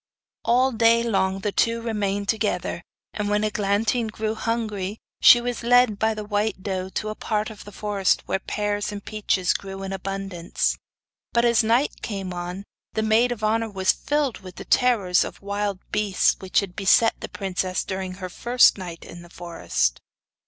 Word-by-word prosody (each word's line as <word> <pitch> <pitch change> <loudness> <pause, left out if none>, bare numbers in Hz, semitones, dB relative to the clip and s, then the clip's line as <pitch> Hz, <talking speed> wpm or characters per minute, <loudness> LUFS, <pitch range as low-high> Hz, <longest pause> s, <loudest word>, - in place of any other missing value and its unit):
All 250 +3 +3
day 230 0 +4
long 195 -4 0
the 205 - -1
two 230 +3 +1
remained 205 -3 -2
together, 205 -6 -1 0.3
and 210 -1 -2
when 210 0 +1
Eglantine 215 +3 0
grew 215 0 -3
hungry 220 -3 -3 0.2
she 240 - +9
was 245 0 -3
led 240 -3 +4
by 220 0 +1
the 215 - -5
white 205 -2 -1
doe 190 -2 -3
to 215 +2 -3
a 215 - -4
part 215 0 -2
of 215 - -12
the 205 - -10
forest 205 -2 0
where 190 - -1
pears 205 +1 -2
and 200 -1 -7
peaches 200 -4 0
grew 195 0 -6
in 195 0 -4
abundance; 195 -2 -2 0.6
but, 235 0 +3
as 235 -1 +4
night 235 +6 +1
came 195 -4 -4
on, 180 +2 -5 0.3
the 220 - 0
maid 225 +3 +3
of 225 -3 -5
honour 225 +1 +1
was 190 -2 +2
filled 290 -4 -1
with 185 -2 -11
the - - -9
terrors 210 -9 +3
of - - -8
wild 200 0 -2
beasts 210 -2 +2
which 190 +1 +1
had 185 -3 -7
beset 205 +3 +4
the - - -6
princess 185 -1 -2
during 190 -1 -4
her 185 -1 -6
first 240 +4 +4
night 175 -3 -8
in 175 - -10
the 175 - -14
forest. 65 - -2
205 Hz, 180 wpm, -24 LUFS, 190-225 Hz, 0.6 s, she